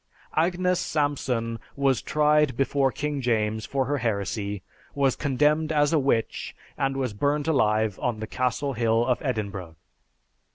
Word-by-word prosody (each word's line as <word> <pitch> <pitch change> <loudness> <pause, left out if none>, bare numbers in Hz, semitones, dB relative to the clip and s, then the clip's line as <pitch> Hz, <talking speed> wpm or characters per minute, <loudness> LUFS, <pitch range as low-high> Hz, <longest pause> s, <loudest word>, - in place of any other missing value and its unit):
Agnes 180 +2 +2
Sampson 125 -6 -1 0.2
was 135 -3 +2
tried 150 -3 +2
before 135 0 +2
King 145 0 -3
James 110 -3 0
for 135 -1 0
her 145 +2 -1
heresy, 100 -3 -2 0.3
was 135 -2 +2
condemned 150 +3 +1
as 145 0 +2
a 160 - +4
witch, 130 -5 -1 0.2
and 135 0 -1
was 130 -5 -1
burned 145 +7 0
alive 110 - +2
on 120 -3 -1
the 110 - -3
Castle 130 +4 -1
Hill 115 0 +2
of 125 -1 0
Edinburgh. 100 - -3
130 Hz, 140 wpm, -26 LUFS, 110-145 Hz, 0.3 s, a